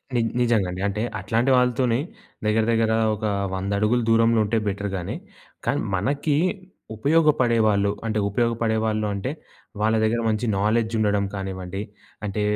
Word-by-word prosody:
ని 120 - +3 0.2
నిజంగా 115 -6 +2
అండి. 90 +1 -5
అంటే 105 +2 -2 0.2
అట్లాంటి 115 +7 +1
వాళ్ళతోని 125 -1 +2 0.5
దెగ్గర 110 +1 +2
దెగ్గర 115 -1 +2 0.2
ఒక 110 +1 -5 0.3
100 95 +2 -3
అడుగులు 115 +3 +2
దూరంలో 115 0 +4
ఉంటే 110 +2 0
బెటర్ 100 0 -2
గానీ, 85 - -4 0.5
కానీ - - +1 0.2
మనకి 140 - 0 0.6
ఉపయోగపడేవాాళ్ళు, 115 -8 +3
అంటే 110 -1 0
ఉపయోగపడేవాాళ్ళు 110 -1 0
అంటే 115 +8 -3 0.5
వాళ్ళ 110 +1 +2
దగ్గర 115 +2 +1
మంచి 110 +2 -1
నాలెడ్జ్ 110 +2 +1
ఉండడం 105 -1 +2
కానివ్వండి, 95 0 -5 0.4
అంటే 105 +1 -2
110 Hz, 135 wpm, -23 LUFS, 100-115 Hz, 0.6 s, దూరంలో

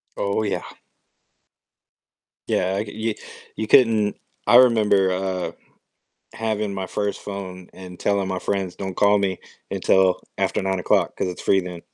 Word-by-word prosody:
Oh, 100 +2 -1
yeah. 105 - -1 1.9
Yeah, 95 +1 0
I 105 - -1
c 110 +1 -3
y - - -13 0.3
you 110 - -3
couldn't 110 -4 +4 0.3
I - - +6
remember, 110 -6 +5
uh, 95 0 -2 0.8
having 110 -2 -2
my 95 -1 -3
first 105 +2 -3
phone 95 -3 -7
and 90 -1 -11
telling 100 -2 0
my 95 -1 -2
friends, 95 -1 -2
"Don't 95 -1 -5
call 105 0 +4
me 95 -2 -1 0.3
until 95 -1 +3 0.2
after - - 0
9:00 95 -2 +1
'cause - - -1
it's 90 - -6
free 95 - +3
then." 90 -2 -7
100 Hz, 145 wpm, -23 LUFS, 95-105 Hz, 1.9 s, I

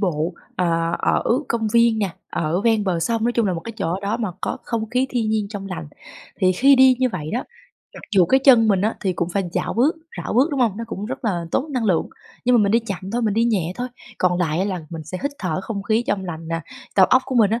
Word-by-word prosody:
bộ, 170 -3 -1 0.2
ờ, 165 -2 +1
ở - - +1 0.3
công 225 -2 0
viên 235 -1 +4
nè, 200 -3 0 0.2
ở 165 +3 -1
ven 220 -2 +2
bờ 175 -3 0
sông, 225 +5 0
nói 240 - +2
chung 235 -3 +1
là 185 - +1
một 165 - -4
cái 230 - -7
chỗ 185 -2 -2
đó 200 +3 -1
mà 225 -4 -2
có - - -2
không 225 -1 -3
khí 255 +2 +1
thiên 225 -3 0
nhiên 215 -2 0
trong 205 -2 -6
lành. 80 - -6 0.5
Thì 185 0 +4
khi 270 +8 +5
đi 260 -1 +6
như 255 -1 +2
vậy 155 -8 -5
đó, 245 - -1 0.5
mặc - - -9
dù 180 -3 +5
cái 265 0 +4
chân 230 -5 +7
mình 195 -3 +3
á, 215 +2 0
thì 190 -2 0
cũng 175 0 -2
phải 195 0 0
chảo - - -2
bước 285 +8 +2 0.2
rảo - - -4
bước, 270 +7 +4
đúng 280 -2 -1
hông? 220 -5 +2
Nó 230 - -4
cũng 210 -2 -5
rất 245 - -6
là 175 -6 -1
tốn 290 - -1
năng 250 -4 -1
lượng, 180 -6 +1 0.4
nhưng 250 0 +4
mà 215 - +4
mình 200 - +2
đi 230 - +5
chậm 195 -3 -6
thôi, 240 - 0
mình 215 -3 +1
đi 230 - +3
nhẹ 190 -8 0
thôi, 250 +1 -3 0.3
còn 180 -1 +2
lại 165 -2 0
á, 190 - +1
là 185 -4 -2
mình 160 -2 -7
sẽ 185 +4 -6
hít 280 - 0
thở 180 -2 -2
không 200 0 -5
khí 220 +3 +1
trong 195 -2 -1
lành 165 -2 -6
nè, 165 0 -2 0.3
tầu 190 -2 +6
óc 255 +5 +4
của 260 - -4
mình 220 -4 +4
á, 225 +2 0
205 Hz, 275 wpm, -21 LUFS, 180-235 Hz, 0.5 s, chân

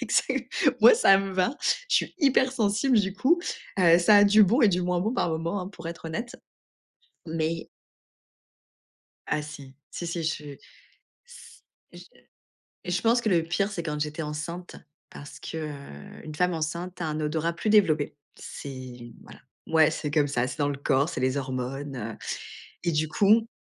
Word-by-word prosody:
exact, - - 0 0.3
moi - - +9
ça 195 - +6
me 195 0 -3
va, 185 +9 0 0.3
je - - +1
suis - - -1
hyper 265 -3 +3
sensible 225 +1 +2
du 195 -2 0
coup. 330 - +2 0.4
Heu, 170 -1 +6
ça 205 +4 +6
a 205 - +7
du 210 +1 +6
bon 240 +8 +2
et 215 - +7
du 180 -1 0
moins 180 0 0
bon 220 +6 -1
par 175 - 0
moment 165 +5 -2
hein, 180 - -5
pour 170 -4 -11
être 165 -1 -8
honnête, 230 +10 -5 0.9
mais 165 0 -2 1.6
Ah 150 - 0
si. 145 -3 -10 0.2
Si, 175 - -5
si 170 -1 -3
je 155 -1 -2 0.8
s 485 0 -15 0.3
je - - -11 0.9
je 180 0 -1
pense 235 +1 +3
que 220 - 0
le 170 -3 +3
pire, 195 +5 -1
c'est 175 - -4
quand 150 -2 -3
j'étais 150 +2 -3
enceinte, 155 +4 -6 0.3
parce 145 - -11
que, - - -7
heu, 140 - -8
une 155 -1 -7
femme 180 +2 +1
enceinte 170 +3 -4
a 160 - -1
un 155 0 -3
odorat 160 +2 -1
plus 195 +5 -3
développé. 155 -9 +3 0.2
C'est 125 -3 -9
voilà, - - -14 0.3
ouais, 160 -1 +5
c'est 150 -2 -4
comme 150 -1 +2
ça, 125 -3 0
c'est 125 +3 -7
dans 145 - +2
le 140 - -3
corps, 140 +1 +1
c'est - - -4
les 130 +2 +1
hormones, 135 +1 -4
heu, 110 -1 -6 0.7
et 170 - +1
du 155 0 0
coup 210 +7 +3
165 Hz, 180 wpm, -26 LUFS, 150-195 Hz, 1.6 s, moi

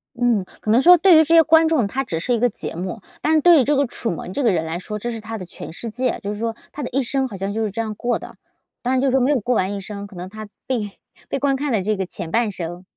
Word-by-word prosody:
嗯， 240 -5 +2 0.2
可 215 - -6
能 240 +4 +5
说 355 +3 +8
对 360 +3 +6
于 320 - +7
这 330 +2 +3
些 330 - +9
观 320 0 +5
众， 260 -11 +2
它 270 +6 -2
只 165 -10 -3
是 245 +8 -1
一 235 - +1
个 245 +1 +3
节 - - -7
目， 185 +5 -5 0.2
但 315 - +2
是 315 - +5
对 335 -3 +7
于 - - +2
这 290 +4 +2
个 280 -2 +2
楚 230 - -4
门 175 +3 -6
这 285 - -1
个 230 - +4
人 165 -3 0
来 160 +1 -3
说， 210 +4 -6
这 240 - -4
是 225 -1 -6
他 225 +1 -6
的 185 - -7
全 170 - -9
世 230 +7 -7
界。 250 +2 -2
就 205 +1 -3
是 205 - -7
说 225 0 -2 0.2
他 295 - -5
的 - - -4
一 275 - 0
生 265 +1 -1
好 195 - -7
像 195 +2 -3
就 220 +1 -1
是 210 - -2
这 230 - -2
样 215 -1 -4
过 240 +2 -1
的， - - -11 0.5
当 255 +1 0
然 260 - +2
就 275 - +2
是 - - +2
说 265 -1 +3
没 270 +4 +3
有 280 - +2
过 240 +3 0
完 190 +1 0
一 200 - -4
生， 200 +1 -7
可 195 - -15
能 180 - -6
他 215 +2 -9 0.2
被 220 -6 -2 0.4
被 - - -1
观 275 0 +1
看 285 0 -2
的 215 -4 +1
这 210 +2 0
个 190 -1 -2
前 165 - -7
半 225 +2 +1
生。 175 -1 -6
230 Hz, 350 characters per minute, -21 LUFS, 200-265 Hz, 0.5 s, 些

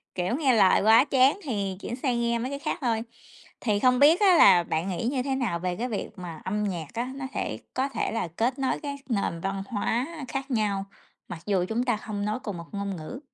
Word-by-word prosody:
kiểu, 180 +6 0
nghe 275 -4 +3
lời 190 -4 +5
quá 220 +5 +7
chán 275 +5 +4
thì 200 - -2
chuyển 240 - -4
sang 250 -2 -1
nghe 235 0 +1
mấy 255 +3 -3
cái 280 - -4
khác - - -2
thôi. 230 -3 +1 0.6
Thì 210 -4 +1
không 250 +2 +3
biết 305 +5 +6
á 375 -3 +6
là 180 - +7
bạn 170 +3 -2
nghĩ 185 +4 -3
như 260 -3 -1
thế 270 0 -1
nào 225 -10 -1
về 180 0 -2
cái 240 +7 -2
việc 210 - -3
mà 170 -3 -8
âm 210 +3 -1
nhạc 175 -6 -3
á, 245 +3 -3
nó 275 -1 -5
thể - - -3
có 265 +2 0
thể - - -2
là 225 -5 -2
kết 250 +4 0
nối 265 - 0
các 280 -1 -4
nền 200 -7 -1
văn 195 +1 -2
hóa 235 +4 -1 0.2
khác 270 +2 -4
nhau, 205 -4 0 0.4
mặc 175 - -7
dù 190 -3 +1
chúng 230 +2 0
ta 240 -4 +1
không 205 -1 -4
nói 215 +3 -1
cùng 205 -7 -4
một 170 - -8
ngôn 200 -1 -3
ngữ? 160 +11 -7
225 Hz, 240 wpm, -26 LUFS, 195-260 Hz, 0.6 s, quá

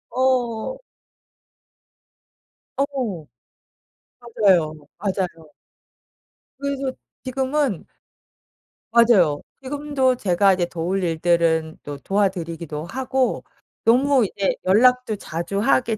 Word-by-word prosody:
어. 255 - 0 2.0
어. 260 - -2 0.9
맞아요. 195 -9 +2 0.2
맞아요. 180 -6 -3 1.1
그래서 275 -1 -3 0.3
지금은 265 - -1 1.1
맞아요. 210 -11 +4 0.2
지금도 275 -1 0
제가 195 -3 +3
이제 180 -1 0
도울 175 +3 -2
일들은 165 -1 +1
또 145 -1 -6
도와 195 +8 +1
드리기도 165 -4 -6
하고 260 +6 -1 0.4
너무 260 +1 +4
이제 195 0 -1
연락도 240 +3 +3
자주 170 +2 -4
하게 230 -1 +2
210 Hz, 185 characters per minute, -22 LUFS, 170-260 Hz, 2.0 s, 맞아요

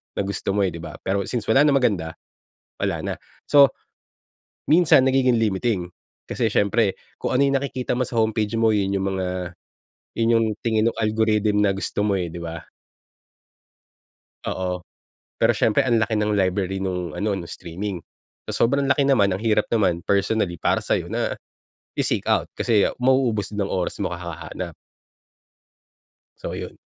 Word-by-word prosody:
na - - 0
gusto 100 0 -2
mo 100 - +3
eh, 95 - -1
di 85 - -7
ba? 80 -2 -8
Pero 100 +1 +1
since 120 -3 -2
wala 125 +5 +5
nang 145 - +4
maganda, 90 -11 0 0.7
wala - - 0
na. - - -2 0.3
So, 140 -2 +7 1.0
minsan 155 -5 +5
nagiging 130 -3 +3
limiting. 100 -3 0 0.4
Kasi - - 0
siyempre, 100 0 +2 0.3
kung - - -2
ano 130 - +3
yung 140 - +1
nakikita 130 -2 -3
mo 130 - +1
sa 120 -2 -1
homepage 110 -1 0
mo 115 0 +4
'yon 100 -1 0
yung 95 - -1
mga 90 -2 -3 0.6
yun 115 0 +2
yung 115 - +2 0.2
tingin 110 -1 +2
nung - - -14
algorithm 110 -1 +2
na 100 - +3
gusto 100 - -3
mo 105 -1 +1
eh, 90 -2 -3
di 85 - -6
ba? 85 -1 -6 1.9
Oo, 90 -1 -2 0.6
pero - - +3
siyempre, 110 - +2
ang 120 -3 +2
laki 110 0 0
ng 105 0 +1
library 95 -1 0
nung 90 -2 -3
ano, 105 -1 -1
nung 90 - -5
streaming. 90 +2 -5 0.5
Sa - - +1
sobrang 140 +3 +1
laki 140 0 +3
naman, 130 -8 +4
ang 95 - -5
hirap 110 -2 +2
naman, 95 -7 +1
personally, 100 0 0
para - - +1
sa'yo - - -1
na - - -1 0.6
i-seek - - 0
out. - - +3
Kasi 110 -5 +2 0.2
mauubos 125 -6 +2
din 105 -1 -2
ang - - -4
oras 90 -2 -2
mo - - -2
kahahanap. 85 -2 -6 1.7
So, - - -5
'yon. - - -7
105 Hz, 165 wpm, -23 LUFS, 95-115 Hz, 1.9 s, So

